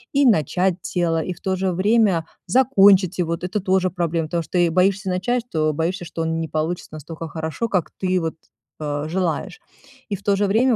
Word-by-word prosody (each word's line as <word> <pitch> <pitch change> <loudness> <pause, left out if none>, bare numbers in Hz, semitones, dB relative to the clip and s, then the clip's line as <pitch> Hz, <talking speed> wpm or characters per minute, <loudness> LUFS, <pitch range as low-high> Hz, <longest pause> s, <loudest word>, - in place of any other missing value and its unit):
И 280 0 +4
начать 185 - +2 0.2
дело, 165 -2 +1
и 185 - -4
в 175 - -18
то 190 -1 0
же 190 0 0
время 195 -1 +3 0.2
закончить 195 -5 +4
его- 170 -1 0
это 180 +4 -3
тоже 190 -1 +1
проблема, 170 -2 -1
потому 170 +1 -1
что 180 - -3
ты 175 - +5
и - - 0
боишься 190 +3 +2
начать, 210 +7 0
что 155 -4 0
боишься, 170 +4 -2
что 165 - -5
оно 165 0 -1
не 165 0 -2
получится 160 +3 -3
настолько 160 +2 -7
хорошо, 160 +7 -3
как 185 -6 -1
ты 185 0 +2
вот, 160 -1 -3 0.4
а, 150 0 -3
желаешь. 180 -1 -2 0.5
И 205 - -1
в 195 - -11
то 200 -1 +2
же 205 - +2
время 235 +5 +3
180 Hz, 205 wpm, -22 LUFS, 165-195 Hz, 0.5 s, ты